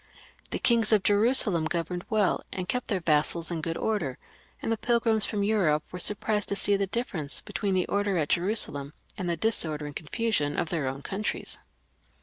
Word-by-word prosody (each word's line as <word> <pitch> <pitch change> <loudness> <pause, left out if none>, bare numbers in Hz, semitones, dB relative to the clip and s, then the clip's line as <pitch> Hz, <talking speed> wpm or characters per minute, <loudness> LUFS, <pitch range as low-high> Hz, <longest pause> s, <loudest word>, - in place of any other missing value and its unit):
The - - -2
kings 230 -2 +2
of 210 -3 +3
Jerusalem 205 -5 +4
governed 170 +2 -3
well, 210 -4 +1
and 185 -1 -5
kept 250 +4 -2
their 195 -4 -2
vassals 165 +2 +2
in 165 -2 -3
good 165 +1 -3
order, 170 -13 -2 0.4
and - - -3
the - - +2
pilgrims 225 -2 +1
fix)m 205 -2 -2
Europe 180 -8 +1
were 180 - -7
sur 210 - +3
prised 210 0 -1
to 200 - 0
see 200 +1 +4
the 195 0 -1
difference 180 - -3
between 200 -3 -3
the 185 - +1
order 200 -2 -1
at 150 -3 -1
Jerusalem 170 -7 +2 0.2
and 185 -4 -4
the 170 - -1
disorder 160 -7 +2
and 145 -1 -8
confusion 160 -4 -2
of 160 - -1
their 155 -6 -2
own 135 +2 -5
countries. 205 +2 0
190 Hz, 190 wpm, -27 LUFS, 160-215 Hz, 0.4 s, Jerusalem